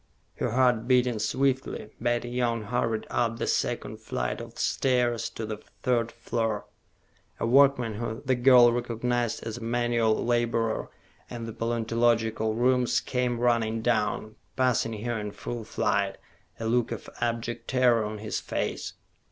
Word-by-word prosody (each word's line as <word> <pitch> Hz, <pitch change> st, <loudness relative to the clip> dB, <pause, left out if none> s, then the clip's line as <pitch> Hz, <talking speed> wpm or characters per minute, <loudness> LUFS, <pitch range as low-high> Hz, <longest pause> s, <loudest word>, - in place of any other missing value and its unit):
Her -, -, -1 dB
heart 120 Hz, -1 st, +2 dB
beating 125 Hz, -3 st, +3 dB
swiftly, 130 Hz, -1 st, -1 dB
Betty 120 Hz, 0 st, 0 dB
Young 120 Hz, -2 st, 0 dB
hurried 115 Hz, 0 st, -1 dB
up 115 Hz, -1 st, 0 dB
the -, -, -2 dB
second -, -, -1 dB
flight 60 Hz, -, -3 dB
of -, -, -10 dB
stairs 125 Hz, -3 st, +1 dB
to 115 Hz, -, -6 dB
the 110 Hz, -1 st, -4 dB, 0.3 s
third 120 Hz, -3 st, +1 dB
floor. 115 Hz, -3 st, -2 dB, 0.7 s
A -, -, 0 dB
workman, 125 Hz, -2 st, +4 dB
whom 110 Hz, +1 st, -4 dB
the 130 Hz, -, +3 dB
girl 125 Hz, -1 st, +6 dB
recognized 120 Hz, -1 st, -1 dB
as 115 Hz, 0 st, -4 dB
a -, -, -9 dB
manual 115 Hz, -1 st, +1 dB
laborer 115 Hz, -2 st, 0 dB, 0.4 s
in 120 Hz, -2 st, -6 dB
the 115 Hz, -, -6 dB
paleontological 115 Hz, -1 st, +1 dB
rooms, 125 Hz, +1 st, +3 dB
came 125 Hz, -2 st, -1 dB
running 115 Hz, -2 st, +1 dB
down, 110 Hz, -2 st, 0 dB, 0.2 s
passing 115 Hz, -4 st, +1 dB
her 120 Hz, -2 st, -1 dB
in 105 Hz, -1 st, -5 dB
full 120 Hz, -2 st, -5 dB
flight, -, -, 0 dB, 0.4 s
a 115 Hz, -, -4 dB
look 120 Hz, +1 st, +1 dB
of -, -, -5 dB
abject 115 Hz, 0 st, -2 dB
terror 125 Hz, -3 st, +3 dB
on 105 Hz, 0 st, -4 dB
his 105 Hz, 0 st, -3 dB
face. -, -, -3 dB
120 Hz, 145 wpm, -27 LUFS, 115-120 Hz, 0.7 s, girl